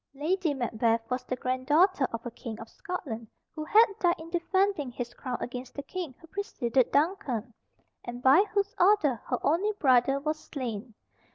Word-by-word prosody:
Lady 330 +3 0
Macbeth 230 -2 0
was 250 0 -1
the 255 - -2
grand 255 +1 -3
daughter 315 -1 +4
of 230 +1 -5
a 240 - -4
King 225 -1 -7
of 225 - -8
Scotland 265 - -6 0.3
who 310 - -5
had 435 +8 +7
died 345 -1 +3
in 325 +1 -10
defending 370 -3 +1
his 240 0 -6
crown 250 -1 -4
against 250 +1 -6
the 280 - -5
King 330 -3 -5
who - - -15
preceded 270 - 0
Duncan, 275 - 0 0.5
and 240 +1 -7
by 275 +9 +7
whose 405 +1 0
order 350 - +4
her 250 - 0
only 370 +8 +2
brother 270 -5 +3
was 305 +2 -2
slain. 235 -5 -6
275 Hz, 175 wpm, -29 LUFS, 245-350 Hz, 0.5 s, had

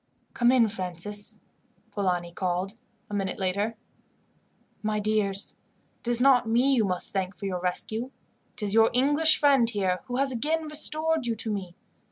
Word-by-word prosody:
"Come 240 0 +3
in, 245 -3 +4
Francis," 200 +1 -5 0.5
Polani 180 -4 -1
called 185 +3 -3 0.3
a 210 - -10
minute 195 -2 -2
later. 200 +4 -1 1.1
"My 215 0 -1
dears, 205 -2 0 0.4
it - - -15
is 240 -1 +4
not 250 -3 +4
me 250 +4 +3
you 240 -4 +3
must 180 -3 -2
thank 190 -1 -2
for 175 - -8
your 185 -2 -2
rescue. 215 +7 -2 0.5
It - - -5
is 205 -1 +2
your 225 0 +5
English 290 +5 +4
friend 275 -5 +4
here 190 -5 -1
who 250 -1 -5
has 275 0 +1
again 305 +7 -1
restored 310 -1 +2
you 230 - 0
to 220 0 -1
me. 185 -4 -6
215 Hz, 165 wpm, -26 LUFS, 190-250 Hz, 1.1 s, your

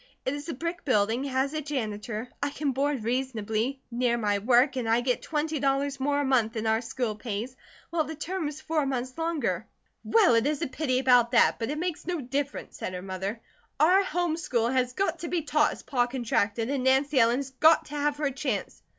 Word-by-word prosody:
"It 260 - 0
is 290 +3 -6
a 325 - -3
brick 335 +5 -4
building, 230 0 +1
has 270 +1 0
a 310 - -2
janitor, 225 -5 -4
I 285 - +1
can 285 0 -2
board 275 -2 -1
reasonably, 240 +1 -2
near 240 0 +1
my 205 -3 +1
work, 245 +6 +4
and 240 -3 -2
I 230 +2 +3
get 250 0 0
twenty 310 0 -2
dollars 275 0 0
more 285 +2 +1
a - - -1
month 240 -4 +2
than 220 -1 -3
our 220 +1 +2
school 240 -1 -2
pays, 225 +3 -5 0.4
while 335 -2 +1
the 320 +1 -6
term 330 +2 -3
is 300 +1 -7
four 310 -3 0
months 255 -1 -3
longer." 280 - -1 0.4
"Well, 435 - +4
it 230 +3 +3
is 295 -1 -1
a - - 0
pity 260 -1 -1
about 250 -2 +4
that; 235 - +4
but 225 - -2
it 300 - -2
makes 345 -1 -3
no 355 -2 -1
difference," 280 +2 -4
said 185 - -4
her 180 - -6
mother. 195 +4 -4 0.4
"Our 365 +6 +5
home 350 -3 -1
school 240 -8 0
has 250 -1 +1
got 340 0 -1
to 335 - -5
be 340 -2 -1
taught 300 0 +2
as - - -12
Pa 245 -3 +1
contracted, 230 -2 -1
and 275 -3 -1
Nancy 265 +2 +3
Ellen 230 +1 +4
has 270 -1 -4
got 315 +5 +5
to 295 - -8
have 290 0 0
her 290 -2 0
chance." 270 +1 -3
265 Hz, 220 wpm, -27 LUFS, 235-295 Hz, 0.4 s, Our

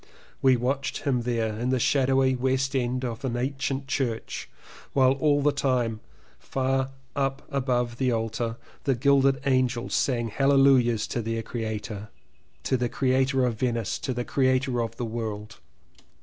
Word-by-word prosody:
We 130 -2 +5
watched 135 +3 -2
him 135 -4 +1
there 115 -2 -1
in 125 +2 -1
the 130 - +2
shadowy 130 +1 +3
West 130 +2 0
End 125 0 0
of 115 -2 -4
the 125 -3 -2
ancient 135 +1 -2
church 125 -4 -3 0.4
while 130 -1 +5
all 145 +1 +2
the 145 - +4
time 125 -5 0 0.4
far 135 0 -1 0.3
up 135 0 -1
above 125 -3 0
the 130 -2 +2
altar, 115 0 -2 0.3
the 135 -3 +2
gilded 135 +1 +3
angels 130 -3 +1
sang 120 -4 +1
hallelujahs 135 -3 +4
to 120 - -2
their 115 0 -2
creator, 110 -2 -5 0.5
to 130 - +1
the 120 -1 -1
creator 130 +1 +2
of 115 -3 -2
Venice, 115 -4 -1
to 130 - -3
the 120 -1 -2
creator 130 -2 +1
of 115 - -4
the 120 - -2
world. 110 -2 -5
130 Hz, 150 wpm, -26 LUFS, 120-135 Hz, 0.5 s, We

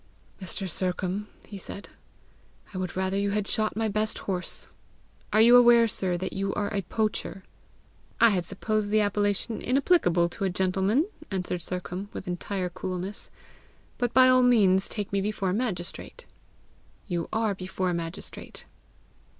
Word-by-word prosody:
"Mr. 190 +1 -5
Sercombe," 185 +3 -2 0.2
he 200 -2 -9
said, 200 +2 -8 0.9
"I 185 - -4
would 185 -1 -4
rather 190 +1 0
you 200 0 +1
had 205 0 -1
shot 215 0 +1
my 225 0 0
best 215 +1 0
horse! 185 -2 -3 0.6
Are 215 +1 +5
you 235 +2 +8
aware, 240 -1 +7
sir, 185 -4 0
that 185 +2 -4
you 195 0 -2
are 205 +1 -2
a 200 - 0
poacher?" 210 0 -2 0.8
"I 230 -1 +7
had 185 -3 0
supposed 215 +2 -2
the 215 +1 +3
appellation 205 +2 0
inapplicable 250 - +3
to 185 - -6
a 195 - +2
gentleman!" 190 - +1 0.2
answered 180 -2 -2
Sercombe, 180 +3 -5
with - - -6
entire 180 +1 -3
coolness. 185 +2 -5 0.7
"But 245 -2 0
by 255 0 +6
all 255 0 +6
means 200 -6 +4
take 205 -2 -5
me 200 - +2
before 200 -2 -1
a - - 0
magistrate." 195 -6 -3 0.8
"You 175 -4 -3
are 220 -2 +1
before 185 -1 -2
a - - -1
magistrate." 170 +2 -6
195 Hz, 155 wpm, -27 LUFS, 185-215 Hz, 0.9 s, you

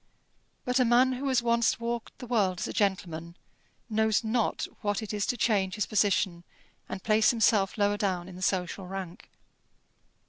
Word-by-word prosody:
But 250 +1 +1
a - - +5
man 250 +2 +4
who 265 +2 -3
has 255 -3 +2
once 235 -1 +2
walked 235 0 -4
the 250 - -8
world 205 -7 +1
as - - -2
a - - -5
gentleman 175 -4 -2 0.5
knows 220 -1 +1
not 225 +1 0 0.2
what 205 +1 -1
it 215 - -6
is 205 -1 -1
to 245 - -1
change 200 -5 +1
his 210 - 0
position, 200 -4 +1 0.5
and 190 - -6
place 215 0 +4
himself 215 -4 +2
lower 205 0 +2
down 185 -4 -1
in 185 - -10
the 185 - -10
social 185 0 -1
rank. 185 -2 -7
210 Hz, 175 wpm, -28 LUFS, 190-235 Hz, 0.5 s, a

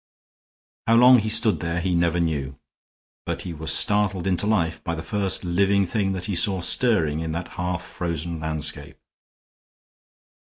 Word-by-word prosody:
How 115 - +4
long 125 +1 +7
he 110 0 -2
stood 110 -1 +3
there 85 0 -3
he 90 +1 -1
never 85 0 +1
knew, 70 -5 -2 0.7
but - - -4
he 90 - -6
was 80 0 -2
startled 100 0 +1
into 95 +1 -1
life 85 -7 0
by 85 - -3
the 80 - -6
first 95 +2 0
living 100 +3 +1
thing 95 +1 -1
that 90 -1 -5
he 105 - -3
saw 95 +2 +3
stirring 85 -6 +2
in 80 -1 -4
that 85 +1 -5
half 90 0 -4
frozen 85 -1 -5
landscape. 75 -1 -3
90 Hz, 160 wpm, -23 LUFS, 80-100 Hz, 0.7 s, long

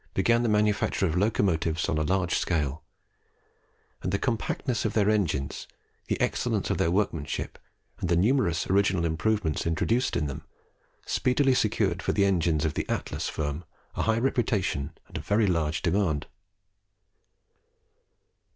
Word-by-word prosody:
began 115 0 +3
the 120 - +1
manufacture 105 -2 +2
of 80 -3 -1
locomotives 90 -5 +1
on 80 - 0
a - - +1
large 90 +1 0
scale; 75 -2 0 1.2
and 90 - -2
the 100 - +1
compactness 120 +1 -1
of 110 - -1
their 105 -1 +3
engines, 80 -10 -1 0.4
the - - -1
excellence - - 0
of - - -1
their 80 - +2
workmanship, 85 -5 -2 0.4
and 90 - -2
the 85 - +3
numerous 95 - +2
original 95 -2 +2
improvements 85 0 0
introduced 115 +10 +1
in 75 - 0
them, 70 -2 -5 0.6
speedily 130 +1 +2
secured 110 -4 +1
for - - 0
the 100 - +3
engines 85 -5 +1
of 80 - 0
the - - -3
Atlas - - -2
firm 75 +2 -3 0.3
a - - -2
high 110 0 +2
reputation 110 - 0
and - - -7
a - - -4
very 105 +2 +2
large 80 -4 0
demand. 90 -8 +1
95 Hz, 145 wpm, -27 LUFS, 80-110 Hz, 1.2 s, began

